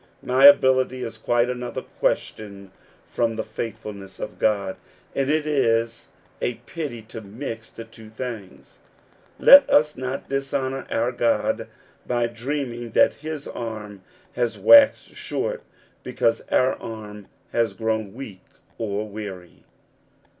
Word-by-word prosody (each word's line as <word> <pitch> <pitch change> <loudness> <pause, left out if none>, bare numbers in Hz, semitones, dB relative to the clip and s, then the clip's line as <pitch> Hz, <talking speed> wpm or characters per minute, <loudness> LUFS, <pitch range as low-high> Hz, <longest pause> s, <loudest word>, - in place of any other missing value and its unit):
My 130 +2 +6
ability 130 -2 +4
is 110 -1 -7
quite 120 +2 +2
another 125 -1 -4
question 100 -2 -3 0.3
from 115 -1 -1
the 110 - -2
faithfulness 105 -3 -7
of - - -7
God, 100 -3 0 0.4
and 135 0 -1
it 155 0 +1
is 115 -6 0 0.3
a 125 - -1
pity 140 -9 -6
to 110 +1 -9
mix 115 +2 -7
the 115 - -9
two 110 -1 -14
things. 110 - -8 0.6
Let 280 0 +8
us 150 0 +4
not 130 +1 -5
dishonor 135 -1 -2
our 120 +2 0
God 120 -2 0 0.4
by 120 -1 +1
dreaming 120 -1 -4
that - - +5
his 155 -2 -5
arm 105 -4 -7 0.3
has 120 -2 -1
waxed 285 -1 +6
short - - -3 0.4
because 115 0 0
our 130 +1 +3
arm 105 -2 -9 0.2
has 115 -4 0
grown 110 -1 -2
weak 105 -8 -9 0.4
or 105 -1 -2
weary. 100 -4 -9
115 Hz, 125 wpm, -23 LUFS, 110-130 Hz, 0.6 s, Let